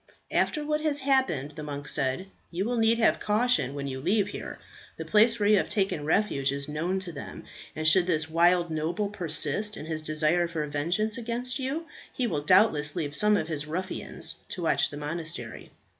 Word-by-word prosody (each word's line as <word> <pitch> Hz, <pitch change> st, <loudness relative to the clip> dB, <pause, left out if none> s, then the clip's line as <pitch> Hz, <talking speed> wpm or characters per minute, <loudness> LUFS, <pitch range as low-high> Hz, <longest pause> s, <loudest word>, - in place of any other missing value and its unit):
"After 300 Hz, -1 st, +1 dB
what 300 Hz, 0 st, 0 dB
has 295 Hz, -2 st, 0 dB
happened," 260 Hz, -, +1 dB
the 155 Hz, -, -6 dB
monk 145 Hz, -1 st, -6 dB
said, 135 Hz, +6 st, 0 dB, 0.2 s
"you 180 Hz, +3 st, -2 dB
will 245 Hz, +1 st, -1 dB
need 225 Hz, 0 st, +3 dB
have 230 Hz, -, +3 dB
caution 210 Hz, -, +1 dB
when 140 Hz, -1 st, -4 dB
you 130 Hz, -1 st, -4 dB
leave 200 Hz, +5 st, +1 dB
here. -, -, -7 dB, 0.4 s
The -, -, -5 dB
place 225 Hz, +2 st, +4 dB
where 205 Hz, -, +2 dB
you 210 Hz, 0 st, +6 dB
have -, -, 0 dB
taken 190 Hz, -7 st, -1 dB
refuge 150 Hz, -6 st, +1 dB
is 140 Hz, 0 st, -4 dB
known 165 Hz, +5 st, -2 dB
to 185 Hz, -2 st, -6 dB
them, 145 Hz, -, -8 dB, 0.3 s
and 155 Hz, 0 st, -1 dB
should 180 Hz, +2 st, +5 dB
this 160 Hz, -3 st, +1 dB
wild 170 Hz, +1 st, +3 dB
noble 165 Hz, +7 st, -1 dB
persist 190 Hz, +2 st, 0 dB
in -, -, -7 dB
his 160 Hz, -1 st, -3 dB
desire 155 Hz, +3 st, +2 dB
for 160 Hz, -3 st, -3 dB
vengeance 175 Hz, -, -1 dB
against 240 Hz, +3 st, -3 dB
you, 275 Hz, +5 st, -3 dB, 0.3 s
he 255 Hz, -, -2 dB
will 165 Hz, -10 st, -1 dB
doubtless 150 Hz, -3 st, +4 dB
leave 150 Hz, -4 st, -2 dB
some 210 Hz, +3 st, +4 dB
of 155 Hz, -, -2 dB
his 155 Hz, -2 st, -3 dB
ruffians 185 Hz, +4 st, -3 dB
to 180 Hz, -, -5 dB
watch 165 Hz, -, +2 dB
the 145 Hz, -, -8 dB
monastery. 150 Hz, -5 st, -5 dB
175 Hz, 195 wpm, -27 LUFS, 150-215 Hz, 0.4 s, you